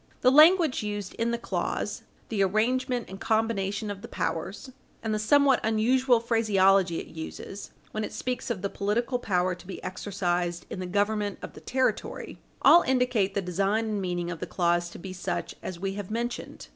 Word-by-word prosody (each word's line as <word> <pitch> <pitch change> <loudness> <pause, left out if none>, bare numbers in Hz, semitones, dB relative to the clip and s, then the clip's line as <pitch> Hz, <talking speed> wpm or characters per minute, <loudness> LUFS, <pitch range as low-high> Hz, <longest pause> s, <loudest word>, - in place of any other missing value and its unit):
The 255 - +5
language 315 0 +6
used 205 -2 -4
in 230 +1 -1
the 235 - 0
clause, - - -3 0.3
the 215 -3 0
arrangement 240 +5 +1
and 190 +1 -9
combination 215 -2 0
of 200 -1 -7
the - - -8
powers, 190 +10 -3 0.3
and 220 -1 -1
the 215 - 0
somewhat 275 +4 +4
unusual 240 +3 +3
phraseology 195 -6 +3
it - - -10
uses 165 +4 -7 0.2
when 215 - -3
it - - -4
speaks 250 0 -3
of 205 -5 -3
the 200 - 0
political 235 +5 0
power 185 -5 +1
to 180 +1 -12
be 195 - -7
exercised 175 -3 -2
in - - -4
the 185 - -4
government 205 +1 0
of - - -7
the - - -12
territory, 260 0 -2 0.2
all 345 - +8
indicate 250 - +1
the 200 - 0
design 195 +5 0
and 210 -2 -1
meaning 175 -1 -2
of 165 - -6
the - - -4
clause 175 -1 +1
to - - -10
be 185 +1 -7
such 185 - -3
as 180 -2 -6
we 195 +1 -2
have 200 -2 -6
mentioned. 235 +2 -4
205 Hz, 185 wpm, -27 LUFS, 185-235 Hz, 0.3 s, all